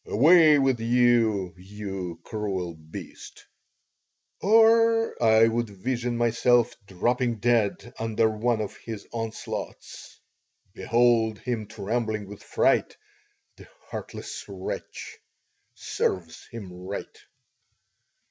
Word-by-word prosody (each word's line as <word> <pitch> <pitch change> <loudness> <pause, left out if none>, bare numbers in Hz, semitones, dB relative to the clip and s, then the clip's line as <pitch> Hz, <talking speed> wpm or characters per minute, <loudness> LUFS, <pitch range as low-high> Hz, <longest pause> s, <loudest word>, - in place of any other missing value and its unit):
Away 155 - +6
with 135 -3 +2
you, 115 -5 +2
you 95 -2 -7
cruel 95 -5 -3
beast!" 80 0 -11 1.0
Or 225 +2 +4
I 110 -1 +6
would 115 0 -1
vision 120 +4 -3
myself 120 0 +2
dropping 120 +6 0
dead 115 +1 0
under 115 0 +1
one 110 +1 0
of 105 - -5
his 110 -3 -8
onslaughts. 115 -1 -6 0.5
Behold 115 +1 +2
him 115 -1 -4
trembling 110 0 -3
with 105 0 -11
fright, - - +1 0.6
the - - -14 0.2
heartless - - -7
wretch! 95 -2 -7 0.6
Serves 85 -3 -3
him 100 -6 -9
right. 90 +3 -7
115 Hz, 95 wpm, -26 LUFS, 100-120 Hz, 1.0 s, Away